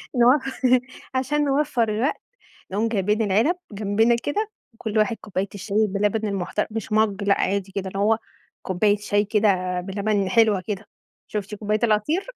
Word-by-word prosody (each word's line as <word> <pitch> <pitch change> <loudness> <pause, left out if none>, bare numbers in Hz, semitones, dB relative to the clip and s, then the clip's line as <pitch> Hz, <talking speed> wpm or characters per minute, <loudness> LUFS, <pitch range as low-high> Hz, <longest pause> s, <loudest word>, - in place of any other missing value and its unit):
نو 250 +4 +5 0.8
عشان 295 +3 +1
نوفر 275 -5 +1
الوقت، 225 +7 -1 0.5
نقوم 215 +4 +1
جايبين 210 0 +1
العلب 220 - +2 0.2
جنبنا 215 +3 +2
كده 420 +8 -1 0.2
وكل 220 -1 -3
واحد 215 +2 +2
كوباية 195 -1 -3
الشاي 205 +2 0
باللبن 210 +2 0
المحتر 195 +1 -2
مش 220 -1 -5
مَج 210 -2 +2
لأ 200 0 +3
عادي 195 0 -1
كده 195 -1 -3
اللي 195 - -6
هو 215 +2 +3 0.4
كوباية 205 +3 +2
شاي 205 0 0
كده 190 -4 +1
بلبن 200 +1 -1
حلوة 215 -2 +3
كده، 210 -1 -4 0.4
شُفتِ 210 0 -4
كوباية 210 +1 -1
العصير 230 - +1
210 Hz, 150 wpm, -23 LUFS, 200-225 Hz, 0.8 s, نو